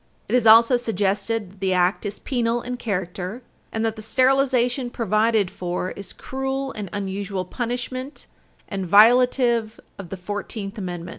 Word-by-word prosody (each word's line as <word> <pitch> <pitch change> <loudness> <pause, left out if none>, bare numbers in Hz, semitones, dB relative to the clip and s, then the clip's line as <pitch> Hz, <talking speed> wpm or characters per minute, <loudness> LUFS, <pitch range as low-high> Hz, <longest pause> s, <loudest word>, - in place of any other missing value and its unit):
It - - -5
is 245 -3 +3
also 230 +3 +7
suggested 205 -2 -1
that 200 - -20
the 190 -1 0
Act 180 +3 +1
is 200 - -5
penal 240 -2 -1
in 250 0 -4
character, 190 +1 -4 0.3
and 220 0 -1
that 225 -1 -1
the 215 - -8
sterilization 255 +1 +2
provided 215 -3 +1
for 180 +1 -3
is 200 -2 -8
cruel 270 +1 -4
and 210 -6 -6
unusual 195 -1 -3
punishment 250 +3 -5 0.4
and 195 -2 -4
violative 235 +1 +4 0.2
of 185 -4 -8
the 195 - -6
Fourteenth 200 +2 -5
Amendment. 175 -2 -5
220 Hz, 150 wpm, -23 LUFS, 195-245 Hz, 0.4 s, also